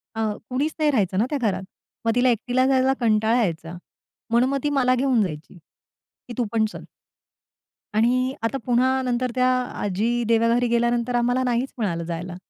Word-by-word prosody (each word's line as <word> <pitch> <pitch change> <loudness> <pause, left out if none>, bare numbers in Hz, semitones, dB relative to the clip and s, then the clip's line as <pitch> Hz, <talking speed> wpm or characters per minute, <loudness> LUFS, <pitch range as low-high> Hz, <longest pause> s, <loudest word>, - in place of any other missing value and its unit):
अ, 225 - -2 0.3
कुणीच 285 +5 -1
नाही 305 -1 +3
राहायचं 195 -8 0
ना 220 - +3
त्या 295 - -1
घरात. 195 -1 -2 0.4
मग 225 - +3
तिला 250 +1 +3
एकटीला 250 +2 +1
जायचा 265 0 +3
कंटाळा 225 +1 +2
यायचा. 165 -2 -4 0.5
म्हणून 240 +3 +3
मग 275 - 0
ती 295 - +1
मला 255 -3 +2
घेऊन 255 -2 +2
जायची 155 -1 -7 0.7
की 245 - -7
तू 245 - +1
पण 220 -1 +3
चल. - - -9 1.1
आणि 230 +3 +3 0.3
आता 230 +4 0
पुन्हा 260 +2 +2
नंतर 250 0 -1
त्या 255 0 +3 0.3
आजी 205 +4 0
देवाघरी 230 +2 +2
गेल्यानंतर, 235 +1 +1
आम्हाला 245 +2 +1
नाहीच 250 +1 -1
मिळालं 175 -7 -2
जायला. 170 +1 -5
240 Hz, 170 wpm, -23 LUFS, 220-255 Hz, 1.1 s, नाही